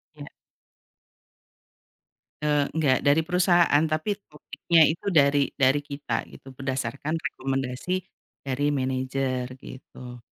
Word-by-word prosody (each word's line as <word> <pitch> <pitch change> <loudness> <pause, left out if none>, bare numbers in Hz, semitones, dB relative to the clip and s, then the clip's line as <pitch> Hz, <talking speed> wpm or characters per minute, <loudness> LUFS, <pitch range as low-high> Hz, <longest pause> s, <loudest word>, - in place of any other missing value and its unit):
Iya. 145 -1 -10 2.1
Eee, 150 -1 +2
enggak, 145 -5 +1
dari 145 +3 +4
perusahaan, 175 -3 +3
tapi 155 +6 -1
topiknya 160 +2 0
itu 160 - -4
dari 140 -2 +4
dari 135 +1 +3
kita 140 0 -3
gitu 135 - -14
berdasarkan 135 +2 -3
rekomendasi 135 +7 -3 0.4
dari 145 +2 -1
manajer 130 -1 -1 0.2
gitu. 125 -2 -11
140 Hz, 100 wpm, -25 LUFS, 130-155 Hz, 2.1 s, dari